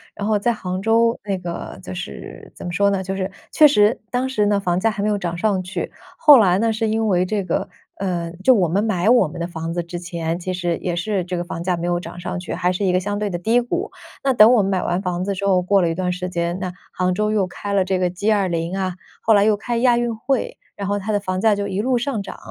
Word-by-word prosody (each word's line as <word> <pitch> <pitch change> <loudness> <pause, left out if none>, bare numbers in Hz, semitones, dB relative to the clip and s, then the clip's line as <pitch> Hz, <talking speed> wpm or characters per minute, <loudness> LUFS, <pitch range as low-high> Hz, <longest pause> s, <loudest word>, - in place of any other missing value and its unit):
然 200 - -4
后 215 -1 +3
在 235 +4 +1
杭 185 -3 -4
州 230 +2 +2
那 195 -2 -2
个 175 - -6
就 90 - -7
是 90 -6 -8
怎 - - -9
么 175 - -3
说 200 +2 +2
呢？ 195 -1 -1
就 190 +1 -3
是 190 0 -2 0.2
确 305 - +7
实 215 -3 +3
当 250 +1 0
时 215 -5 +1
呢， 205 -1 +2
房 180 -2 0
价 225 - +2
还 210 -1 -4
没 210 - +1
有 210 - +1
涨 175 -3 -3
上 195 -1 +1
去。 185 +1 -4 0.3
后 295 -3 +8
来 185 -3 +4
呢， 225 +1 +2
是 220 0 -1
因 220 +1 0
为 180 -3 +2
这 200 +1 -1
个 175 - -1 0.3
呃， 175 -3 -3
就 260 - +7
我 185 -5 +2
们 195 +5 +1
买 195 -2 +1
我 240 -7 +5
们 170 +3 -9
的 170 - -2
房 165 -1 -5
子 175 0 -2
之 170 +1 -6
前， 170 -1 -3
其 185 +1 -3
实 175 -2 -1
也 175 -2 -3
是 185 +1 -1
这 180 0 -3
个 175 - -2
房 170 -1 -6
价 180 0 +1
没 170 0 -3
有 175 0 +1
涨 175 - -9
上 180 - -4
去， 175 - -6
还 180 +1 0
是 185 +2 -2
一 180 - +2
个 185 - +3
相 205 +2 -3
对 210 -1 -1
的 175 - -3
低 225 +7 +2
谷。 240 0 -3 0.3
那 270 -1 +2
等 230 0 +7
我 235 - +5
们 195 - 0
买 185 -2 +1
完 175 +1 -1
房 180 -1 -2
子 200 - -1
之 200 - -3
后， 190 -2 +3
过 195 +1 +3
了 170 - +2
一 165 - -2
段 180 0 -1
时 180 0 -4
间， 170 0 -2
那 185 -2 -3 0.2
杭 185 0 0
州 210 +3 0
又 205 -3 +2
开 200 +3 -5
了 195 -1 +3
这 185 0 -1
个 180 - +1
G20 185 -2 0
啊， 185 -2 -2 0.3
后 225 - +4
来 205 -1 +5
又 210 -1 +3
开 235 +3 -3
亚 240 0 +4
运 240 -1 -1
会， 255 +4 -2 0.2
然 200 -1 -4
后 205 - 0
它 215 +3 -3
的 205 - +1
房 185 -2 -3
价 220 0 +4
就 200 0 -2
一 200 +1 -2
路 255 +1 +1
上 240 -3 -2
涨， - - -8
190 Hz, 305 characters per minute, -21 LUFS, 180-215 Hz, 0.3 s, 后